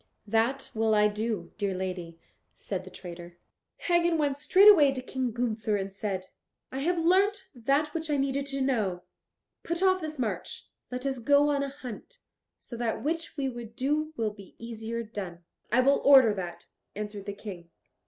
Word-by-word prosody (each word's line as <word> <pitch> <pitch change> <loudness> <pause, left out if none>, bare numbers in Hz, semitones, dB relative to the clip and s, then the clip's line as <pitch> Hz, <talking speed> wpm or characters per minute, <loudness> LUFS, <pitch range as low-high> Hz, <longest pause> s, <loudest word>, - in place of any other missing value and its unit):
"That 230 +6 0
will 220 -1 +2
I 210 0 +5
do, 210 -4 -3
dear 200 -2 0
lady," 180 -3 -5 0.3
said - - -5
the - - -9
traitor. 175 -1 -10 0.4
Hagen 345 -1 +2
went 285 -2 0
straightway 370 -4 +7
to 265 - -4
King 260 0 -2
Gunther 220 -2 -1
and 195 -1 -3
said, 195 -2 -4 0.4
"I 265 - -4
have 345 +5 +1
learnt 380 +3 +2
that 275 +5 0
which 320 -1 -3
I 295 - +2
needed 275 0 -1
to 275 0 -3
know; 210 -10 0 0.6
put 340 +2 -2
off 375 -1 +4
this 310 -1 -5
march; 210 -8 -3 0.2
let 250 +1 -5
us 265 -2 -1
go 285 +4 +4
on 285 -1 +1
a 280 - -2
hunt. 270 - -9 0.4
So 240 - -9
that 235 -1 -2
which 325 +1 -2
we 275 -2 0
would 235 -3 -7
do 300 +5 0
will 220 -2 0
be 200 -3 -14
easier 230 0 -5
done." 190 -6 -7 0.3
"I 245 +3 +5
will 275 +2 +4
order 265 -6 +8
that," 180 -3 -6 0.3
answered 205 -1 -5
the 200 - -3
King. 185 -5 -9
245 Hz, 175 wpm, -28 LUFS, 205-285 Hz, 0.6 s, order